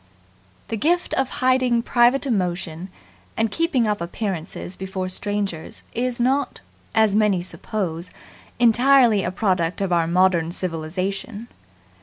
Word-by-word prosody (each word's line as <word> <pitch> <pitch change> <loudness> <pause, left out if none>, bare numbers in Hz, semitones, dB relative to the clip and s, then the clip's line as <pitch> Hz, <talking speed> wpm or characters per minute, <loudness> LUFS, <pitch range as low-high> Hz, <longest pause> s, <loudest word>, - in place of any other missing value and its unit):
The 225 - -2
gift 345 +9 +1
of 265 -1 +1 0.2
hiding 255 -2 +3
private 245 +4 +3
emotion 180 - -2 0.5
and 225 -1 +1
keeping 280 -7 +1
up 210 -3 -1
appearances 175 -1 -4
before 190 -1 -4
strangers 200 -3 -4
is 245 +1 -1
not, 265 +4 0 0.4
as 220 -2 +4
many 205 -4 +2
suppose, 180 -2 -4 0.5
entirely 240 -2 +5
a - - -1
product 185 -3 0
of 195 -3 0
our 165 -1 +2
modern 175 -1 +2
civilization. 190 +7 -4
205 Hz, 120 wpm, -22 LUFS, 180-240 Hz, 0.5 s, entirely